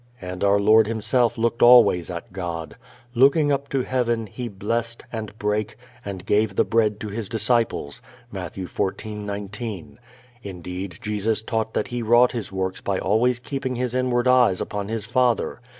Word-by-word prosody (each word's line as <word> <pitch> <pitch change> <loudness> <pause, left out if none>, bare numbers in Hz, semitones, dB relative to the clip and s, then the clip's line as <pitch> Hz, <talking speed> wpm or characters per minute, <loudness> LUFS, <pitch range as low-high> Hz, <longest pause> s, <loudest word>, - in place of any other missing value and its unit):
And 90 0 -6
our 100 0 +4
Lord 110 +1 +5
Himself 115 +2 +1
looked 115 +1 0
always 120 -8 +6
at 85 +1 -7
God. 85 -4 -5 0.4
"Looking 140 +4 +4
up 140 0 -1
to 135 -2 0
heaven, 120 -3 0
he 120 +4 -6
blessed, 115 +3 -3
and 110 -1 -6
brake, 105 0 -1 0.3
and 95 -3 -7
gave 105 -1 +1
the - - +3
bread 110 -2 +1
to 110 - -4
his 105 0 -5
disciples" 115 - 0 0.3
(Matt. - - -6
14:19). 100 +1 -5 0.4
Indeed 90 -2 -7
Jesus 105 +1 -1
taught 110 -1 -2
that - - -1
He 120 0 -3
wrought 120 +2 +5
His 115 -6 -5
works 95 -1 -3
by 100 -1 -1
always 115 +6 +2
keeping 130 +1 -4
His 125 0 -2
inward 125 -1 +1
eyes 125 -7 +4
upon 100 -1 -4
His 110 -1 -4
Father. 120 0 +1
110 Hz, 160 wpm, -23 LUFS, 100-120 Hz, 0.4 s, always